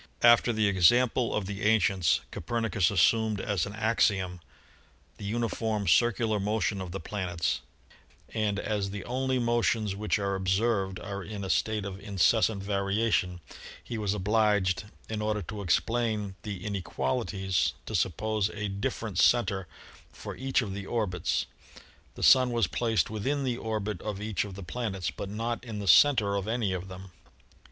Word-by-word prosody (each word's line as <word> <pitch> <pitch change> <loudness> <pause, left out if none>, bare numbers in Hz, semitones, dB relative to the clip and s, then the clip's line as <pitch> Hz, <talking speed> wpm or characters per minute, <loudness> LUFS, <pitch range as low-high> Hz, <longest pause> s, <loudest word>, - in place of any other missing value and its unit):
After 120 +1 +6
the 110 -1 +1
example 115 +6 +3
of 105 - -1
the 100 +1 -5
ancients, 100 -5 +3
Copernicus 110 -7 0
assumed 105 +3 +3
as 100 -3 -1
an 100 - -7
axiom 100 -5 +1 0.8
the 100 - -7
uni 115 +3 0
form, 110 -3 -2
circular 110 +2 +3
motion 105 -1 -1
of 95 - -5
the 95 - -4
planets, 90 -10 -2 0.7
and, 105 -2 0
as 105 -1 -2
the 100 -1 -6
only 130 +1 -1
motions 115 -4 +1
which 105 +2 0
are 100 -1 -1
observed 95 +1 0
are 100 -1 -6
in 100 +1 -6
a 95 - -1
state 110 -2 0
of 100 -1 -6
incessant 100 +1 +2
variation, 100 -2 0 0.4
he 115 -2 -5
was 105 -1 0
obliged, 105 -1 +1 0.2
in 110 -1 -3
order 105 -1 -1
to 105 +4 -6
explain 105 +1 0
the 100 -4 -6
inequali 85 -10 -2
ties 95 -4 0
to - - -7
suppose 110 -2 0
a 105 -1 -3
different 100 -1 -3
center 100 -6 +3 0.4
for - - -8
each 135 0 0
of 100 -4 -5
the 100 0 -6
orbits. 105 -7 -1 0.7
The - - -6
Sun 130 -1 +7
was 120 -3 +2
placed 110 +3 0
within 135 +7 -1
the 125 -3 -1
orbit 105 -4 -3
of 105 -2 -4
each 105 0 -2
of 100 -2 -8
the 100 - -8
plan 110 +2 -3
ets, 95 -2 -2
but 100 - -6
not 115 +3 -3
in 115 -4 -6
the 100 -1 -5
center 105 - +5
of 100 +1 -3
any 110 -4 0
of 90 +1 -4
them. 95 0 -10
105 Hz, 165 wpm, -28 LUFS, 95-115 Hz, 0.8 s, Sun